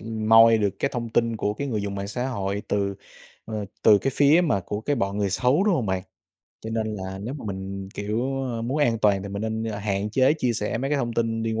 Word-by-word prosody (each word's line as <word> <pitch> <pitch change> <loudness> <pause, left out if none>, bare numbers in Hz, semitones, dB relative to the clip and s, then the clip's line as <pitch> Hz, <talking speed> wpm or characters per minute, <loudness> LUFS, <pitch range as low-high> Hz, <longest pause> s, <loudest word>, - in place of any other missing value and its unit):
ừm, 110 -1 -4
moi 115 0 +7
được 105 -2 +1
cái 140 - 0
thông 120 -1 -3
tin 115 0 +1
của 105 -1 -1
cái 140 +6 -4
người 110 -5 -1
dùng 100 -1 -3
mạng 100 0 -4
xã 125 +4 -2
hội 100 -4 -3
từ, 100 -1 0 0.5
ờ, 110 -2 -4 0.2
từ 105 -2 +7
cái 135 - -1
phía 145 +4 +5
mà 125 - +1
của 105 +3 -4
cái 145 +6 -1
bọn 100 -3 -1
người 100 -2 0
xấu, 130 - +2
đúng 210 -4 +3
hông 125 -9 -1
bạn? 95 -1 -1 0.6
Cho 110 - -6
nên 110 -1 -2
là 95 -1 -6
nếu 115 +8 -5
mà 140 - -8
mình, 95 -1 -5
kiểu, 120 +6 -2
ơ, 115 -3 -3
muốn 130 +6 -1
an 120 -6 +2
toàn 100 -3 +2
thì 100 - -6
mình 100 +1 -4
nên 110 0 -2 0.2
hạn 100 0 -1
chế 130 +4 +4
chia 130 -6 0
sẻ 110 0 -2
mấy 135 +3 -2
cái 150 - +2
thông 120 -3 -2
tin 115 -1 -1
liên 110 0 -1
110 Hz, 260 wpm, -25 LUFS, 100-125 Hz, 0.6 s, moi